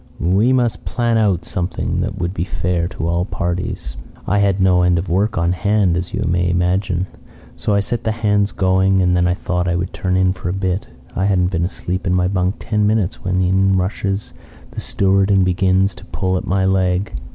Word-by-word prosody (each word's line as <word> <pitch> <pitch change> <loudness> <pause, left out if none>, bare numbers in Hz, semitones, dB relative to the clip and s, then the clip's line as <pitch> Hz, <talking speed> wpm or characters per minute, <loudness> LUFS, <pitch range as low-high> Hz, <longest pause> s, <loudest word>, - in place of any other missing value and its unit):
'We 100 +8 +2
must 120 -3 0
plan 120 -2 0
out 95 -6 +1
something 90 0 -2
that - - -3
would 85 0 -2
be 85 - -2
fair 90 -1 -1
to 85 -3 -4
all 85 +1 +1
parties.' 90 -2 -4 0.3
"I 100 +1 +1
had 100 -1 +2
no 90 -1 +4
end 90 -1 +3
of 85 +2 -3
work 100 +5 +1
on 85 +1 +1
hand, 100 0 +1
as 90 0 -3
you - - -2
may 90 0 +1
imagine, 90 +1 0 0.5
so 105 -2 -1
I 100 - +3
set 120 +3 -3
the 110 - 0
hands 105 -2 +1
going, 95 0 +2
and 90 0 +2
then 90 0 +2
I 90 - +1
thought 90 -1 -2
I 85 - +1
would 90 +2 -3
turn 90 -1 -1
in 95 0 +3
a 90 - -1
bit. 95 0 -2 0.3
I 95 - 0
hadn't 90 -2 +2
been 85 -2 0
asleep 95 +1 -4
in 90 - +2
my 90 0 +2
bunk 95 0 0
ten 105 -1 0
minutes 105 -4 0
when 95 0 0
in 95 +1 +2
rushes 95 +1 -2 0.4
the - - -6
steward 95 0 +1
and 95 -2 +4
begins 95 +1 +2
to 90 +4 -14
pull 95 -2 -2
at 90 - -3
my 95 0 +1
leg. 95 0 +1
95 Hz, 210 wpm, -19 LUFS, 90-100 Hz, 0.5 s, no